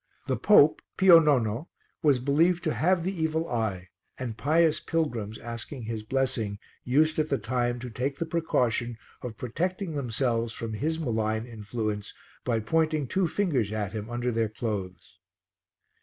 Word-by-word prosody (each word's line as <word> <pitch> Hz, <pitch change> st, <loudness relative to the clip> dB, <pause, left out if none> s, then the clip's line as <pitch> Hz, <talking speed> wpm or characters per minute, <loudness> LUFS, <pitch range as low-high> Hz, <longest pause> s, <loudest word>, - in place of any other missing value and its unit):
The -, -, 0 dB
pope, -, -, +5 dB, 0.2 s
Pio 185 Hz, -3 st, +9 dB
Nono, 135 Hz, -3 st, +1 dB, 0.3 s
was 145 Hz, -5 st, +4 dB
believed 160 Hz, +7 st, +2 dB
to 155 Hz, -, 0 dB
have 175 Hz, +1 st, +2 dB
the 190 Hz, +3 st, -1 dB
evil 160 Hz, 0 st, -1 dB
eye, 100 Hz, -, -2 dB, 0.3 s
and 120 Hz, -4 st, -4 dB
pious 155 Hz, +4 st, +3 dB
pilgrims 120 Hz, -10 st, -2 dB
asking 120 Hz, +3 st, -7 dB
his 110 Hz, 0 st, -4 dB
blessing 115 Hz, -3 st, -1 dB, 0.3 s
used, 155 Hz, +5 st, +2 dB
at 155 Hz, 0 st, +1 dB
the 140 Hz, -, +2 dB
same 110 Hz, -, -6 dB
time, 120 Hz, +1 st, 0 dB
to 125 Hz, -, -5 dB
take 135 Hz, +5 st, -2 dB
the 165 Hz, -, -2 dB
precaution 125 Hz, -8 st, 0 dB, 0.2 s
of 115 Hz, -3 st, -6 dB
protecting 180 Hz, -, -2 dB
themselves 120 Hz, -4 st, -1 dB
from 115 Hz, -1 st, -5 dB
his 160 Hz, +9 st, -1 dB
malign 110 Hz, -5 st, -1 dB
influence 110 Hz, -2 st, -4 dB, 0.3 s
by 115 Hz, -3 st, +1 dB
pointing 155 Hz, +4 st, +1 dB
two 185 Hz, +7 st, +1 dB
fingers 150 Hz, -, 0 dB
at 105 Hz, -2 st, -3 dB
him 110 Hz, 0 st, -5 dB
under 120 Hz, +1 st, -1 dB
their 115 Hz, -1 st, 0 dB
clothes. 100 Hz, -6 st, -5 dB
125 Hz, 155 wpm, -27 LUFS, 110-155 Hz, 0.3 s, Pio